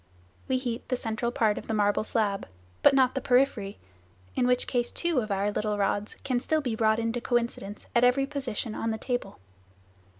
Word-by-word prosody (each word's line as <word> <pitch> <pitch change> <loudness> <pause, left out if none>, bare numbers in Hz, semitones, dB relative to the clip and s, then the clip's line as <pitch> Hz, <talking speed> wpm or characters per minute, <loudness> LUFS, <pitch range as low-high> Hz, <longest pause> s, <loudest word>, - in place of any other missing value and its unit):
We 260 - +2
heat 245 -3 -4
the 255 - +2
central 235 0 -2
part 220 -3 +2
of - - -12
the 220 - -1
marble 205 0 +2
slab, 210 -3 -1 0.3
but 275 - +6
not 260 -2 +4
the 270 - -2
periphery, 245 -6 +2 0.6
in 245 - +2
which 250 0 +2
case 240 -1 0
two 340 -6 0
of 220 -3 -3
our 200 +1 0
little 210 0 -1
rods 205 +1 0
can 255 -2 0
still 315 +5 0
be 250 -6 -2
brought 220 -1 +3
into 230 +1 -1
coincidence 235 -4 -2
at 235 - +4
every 250 +2 +4
position 265 -6 -3
on 225 - -2
the 220 - -1
table. 245 -4 -3
235 Hz, 195 wpm, -28 LUFS, 215-250 Hz, 0.6 s, but